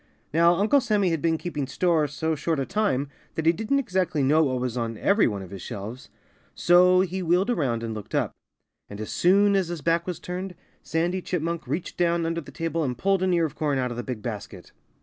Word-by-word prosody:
Now, 170 Hz, +2 st, +5 dB
Uncle 215 Hz, +10 st, +3 dB
Sammy 210 Hz, -6 st, +1 dB
had 165 Hz, -3 st, -1 dB
been 165 Hz, -1 st, +1 dB
keeping 150 Hz, -6 st, -4 dB
store 160 Hz, +1 st, +1 dB
so 160 Hz, +3 st, -2 dB
short 160 Hz, 0 st, -1 dB
a 135 Hz, -, -1 dB
time 195 Hz, -9 st, 0 dB, 0.3 s
that 160 Hz, -, -2 dB
he 165 Hz, -, +6 dB
didn't 220 Hz, +10 st, -1 dB
exactly 180 Hz, -, 0 dB
know 155 Hz, +4 st, +4 dB
what 130 Hz, -2 st, -1 dB
was 125 Hz, -1 st, -2 dB
on 115 Hz, -2 st, -3 dB
every 205 Hz, -, +3 dB
one 100 Hz, -3 st, -3 dB
of 90 Hz, -, -12 dB
his 100 Hz, -2 st, -8 dB
shelves. 110 Hz, +8 st, -7 dB, 0.5 s
So 180 Hz, +1 st, +5 dB
he 190 Hz, 0 st, -2 dB
wheeled 180 Hz, +6 st, +2 dB
around 125 Hz, -, -1 dB
and 115 Hz, -1 st, -3 dB
looked 105 Hz, -3 st, -7 dB
up. -, -, +1 dB, 0.6 s
And 100 Hz, -, -8 dB
as 110 Hz, -, -5 dB
soon 200 Hz, +3 st, +4 dB
as 190 Hz, -3 st, +1 dB
his 170 Hz, -2 st, -5 dB
back 165 Hz, +3 st, +1 dB
was 175 Hz, -2 st, -4 dB
turned, 180 Hz, +1 st, -5 dB, 0.3 s
Sandy 175 Hz, +3 st, -1 dB
Chipmunk 170 Hz, -2 st, -3 dB
reached 170 Hz, -, -4 dB
down 170 Hz, -1 st, +1 dB
under 165 Hz, 0 st, -1 dB
the -, -, -13 dB
table 165 Hz, 0 st, -2 dB
and 125 Hz, -4 st, -2 dB
pulled 195 Hz, +5 st, +1 dB
an 185 Hz, 0 st, +2 dB
ear 170 Hz, -2 st, +3 dB
of 155 Hz, -, -5 dB
corn 150 Hz, -4 st, -1 dB
out 125 Hz, -1 st, -1 dB
of 120 Hz, -, -6 dB
the -, -, -2 dB
big 120 Hz, -4 st, -6 dB
basket. 100 Hz, -5 st, -7 dB
165 Hz, 230 wpm, -25 LUFS, 130-180 Hz, 0.6 s, he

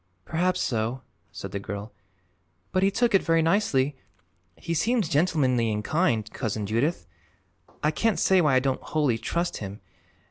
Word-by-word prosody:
"Perhaps 180 Hz, +3 st, 0 dB
so," 115 Hz, +2 st, -1 dB, 0.3 s
said -, -, -7 dB
the 100 Hz, -, -3 dB
girl. 100 Hz, +2 st, -6 dB, 0.8 s
"But 185 Hz, -, +1 dB
he 195 Hz, -, +4 dB
took 235 Hz, +3 st, +1 dB
it 195 Hz, -, +5 dB
very 165 Hz, 0 st, +2 dB
nicely. 150 Hz, -7 st, +2 dB, 0.6 s
He 165 Hz, -, -4 dB
seems 220 Hz, +4 st, +1 dB
gentlemanly 140 Hz, -8 st, +2 dB
and 105 Hz, 0 st, -2 dB
kind, 125 Hz, -, +1 dB
Cousin 110 Hz, -4 st, -3 dB
Judith. 120 Hz, -, 0 dB, 0.8 s
I 150 Hz, -, +3 dB
can't 225 Hz, +7 st, +1 dB
say 190 Hz, -1 st, +4 dB
why 150 Hz, -5 st, +3 dB
I -, -, +6 dB
don't 130 Hz, 0 st, -1 dB
wholly 145 Hz, -7 st, 0 dB
trust 170 Hz, +7 st, -2 dB
him. 100 Hz, 0 st, -7 dB
145 Hz, 155 wpm, -26 LUFS, 115-175 Hz, 0.8 s, I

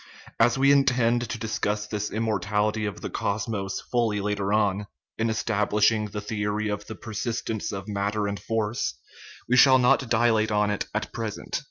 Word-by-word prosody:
As 120 Hz, -, +4 dB
we 135 Hz, +1 st, +5 dB
intend 120 Hz, -4 st, +3 dB
to -, -, -3 dB
discuss 105 Hz, -1 st, -2 dB
this 105 Hz, -1 st, -3 dB
immor 110 Hz, -3 st, -1 dB
tality 105 Hz, +2 st, 0 dB
of 100 Hz, -, -6 dB
the -, -, -4 dB
cosmos 100 Hz, -2 st, -2 dB
fully 115 Hz, -4 st, 0 dB
later 100 Hz, -1 st, -1 dB
on, 105 Hz, -1 st, +1 dB, 0.3 s
in 115 Hz, +1 st, +1 dB
establishing 105 Hz, 0 st, +1 dB
the 105 Hz, +1 st, -5 dB
theory 105 Hz, -1 st, -2 dB
of 105 Hz, 0 st, -4 dB
the 110 Hz, -, -6 dB
persistence 110 Hz, 0 st, -3 dB
of 100 Hz, +1 st, -6 dB
matter 105 Hz, +1 st, -1 dB
and 100 Hz, 0 st, -3 dB
force, 110 Hz, 0 st, -2 dB, 0.5 s
we 125 Hz, -, +3 dB
shall 130 Hz, 0 st, +8 dB
not 125 Hz, 0 st, +3 dB
dilate 110 Hz, -2 st, +3 dB
on 105 Hz, -1 st, +2 dB
it 105 Hz, -, -2 dB
at 110 Hz, 0 st, -3 dB
present. 110 Hz, -3 st, -4 dB
105 Hz, 170 wpm, -26 LUFS, 105-115 Hz, 0.5 s, shall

